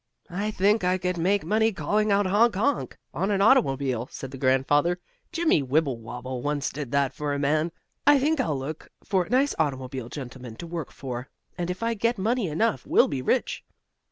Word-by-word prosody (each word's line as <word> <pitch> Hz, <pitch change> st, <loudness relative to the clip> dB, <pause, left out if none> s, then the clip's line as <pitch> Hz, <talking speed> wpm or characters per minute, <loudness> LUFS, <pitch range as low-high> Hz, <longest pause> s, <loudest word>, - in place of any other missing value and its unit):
"I 200 Hz, +4 st, -2 dB
think 210 Hz, +1 st, +2 dB
I 180 Hz, +1 st, +2 dB
could 180 Hz, -1 st, -2 dB
make 195 Hz, +4 st, +1 dB
money 220 Hz, +1 st, +2 dB
calling 210 Hz, +1 st, 0 dB
out 200 Hz, 0 st, +3 dB
'honk 210 Hz, +4 st, +3 dB
honk!' 260 Hz, +9 st, 0 dB, 0.2 s
on 195 Hz, -, -1 dB
an 200 Hz, -2 st, +1 dB
automobile," 135 Hz, -, +3 dB
said 135 Hz, -, -7 dB
the 135 Hz, -, -7 dB
grandfather. 145 Hz, +6 st, +2 dB, 0.3 s
"Jimmie 330 Hz, -, +2 dB
Wibblewobble 130 Hz, -3 st, -2 dB
once 145 Hz, +1 st, -1 dB
did 140 Hz, -4 st, -6 dB
that 140 Hz, -1 st, +2 dB
for 145 Hz, -1 st, -2 dB
a -, -, -1 dB
man. 155 Hz, +4 st, +1 dB, 0.4 s
I 290 Hz, 0 st, +8 dB
think 295 Hz, +3 st, +1 dB
I'll 155 Hz, -, 0 dB
look 145 Hz, +4 st, -6 dB
for 185 Hz, -3 st, +1 dB
a -, -, -15 dB
nice 270 Hz, +3 st, +3 dB
automobile 130 Hz, -4 st, -2 dB
gentleman 125 Hz, -3 st, -8 dB
to 170 Hz, -, -8 dB
work 165 Hz, -3 st, -5 dB
for, 125 Hz, -1 st, -6 dB, 0.3 s
and 175 Hz, -1 st, -3 dB
if 180 Hz, +5 st, -4 dB
I 230 Hz, 0 st, +1 dB
get 230 Hz, +2 st, 0 dB
money 220 Hz, +2 st, 0 dB
enough 205 Hz, +9 st, 0 dB
we'll -, -, +5 dB
be 135 Hz, -3 st, -2 dB
rich." -, -, 0 dB
170 Hz, 190 wpm, -26 LUFS, 135-210 Hz, 0.4 s, I